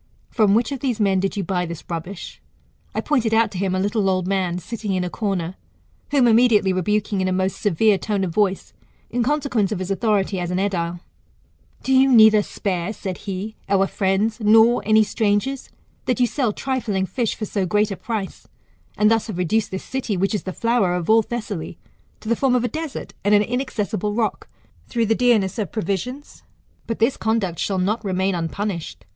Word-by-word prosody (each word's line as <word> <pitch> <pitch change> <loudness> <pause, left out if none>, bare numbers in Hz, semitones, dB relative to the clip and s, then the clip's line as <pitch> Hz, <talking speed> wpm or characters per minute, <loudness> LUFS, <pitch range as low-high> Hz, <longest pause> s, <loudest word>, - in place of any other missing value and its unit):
From 210 -3 +3
which 230 +2 +1
of 275 - -3
these 245 -4 -1
men 195 -2 +2
did 195 +2 -2
you 200 - -1
buy 180 0 -1
this 170 -1 -7
rubbish? 175 +3 -6 0.5
I - - 0
pointed 235 -7 +1
out 230 0 +3
to 185 - -5
him 190 -1 0
a - - 0
little 205 0 +1
old 185 -1 0
man 185 -3 0
sitting 205 +3 -4
in 185 - 0
a 180 - -4
corner, 190 -5 -2 0.6
whom 275 -4 +4
immediately 225 -4 +4
rebuking 205 +2 0
in 185 - 0
a - - 0
most 185 +1 -1
severe 205 +1 +3
tone 205 -3 -1
of 175 -3 -3
voice, 195 -1 0 0.4
in 245 - 0
consequence 250 -6 0
of 210 - -1
his 185 +1 -4
authority 195 -1 0
as 175 -1 -3
an 180 - -1
edile. 175 -3 -1 0.8
Do 265 - +1
you 265 +1 +5
neither 220 -3 +7
spare, 195 -1 -3
said 190 -4 -5
he, 200 +3 -5
our 195 -1 +3
friends, 200 +3 0
nor 225 +2 +5
any 215 0 +5
strangers, 220 +5 -1 0.4
that 250 0 0
you 250 - +5
sell 245 -2 0
trifling 225 -6 -2
fish 225 +5 -2
for 215 - -4
so 195 -2 -2
great 210 +3 +1
a - - -2
price, 215 -2 -5 0.5
and 210 +1 +4
thus 225 0 +1
have 210 -6 -5
reduced 205 +5 0
this 190 - -5
city, 245 -7 -3
which 195 +4 0
is 210 - -2
the 185 - -3
flower 230 -3 +1
of 180 +3 0
all 225 0 +6
Thessaly, 210 -8 -5 0.4
to - - -10
the 230 - +2
form 260 +1 +2
of 245 - +1
a - - +1
desert, 310 +4 -6
and 205 +1 +4
an 205 - +4
inaccessible 215 -4 -2
rock, 225 -2 -2 0.4
through 230 -2 0
the 225 - +2
deamess 225 -4 +2
of 200 -7 -2
provisions? 215 - -4 0.5
But 230 - -2
this 230 +4 +2
conduct 220 -6 -1
shall 195 - -1
not 210 +5 0
remain 190 0 0
unpunished. 175 +1 -4
210 Hz, 200 wpm, -22 LUFS, 190-230 Hz, 0.8 s, neither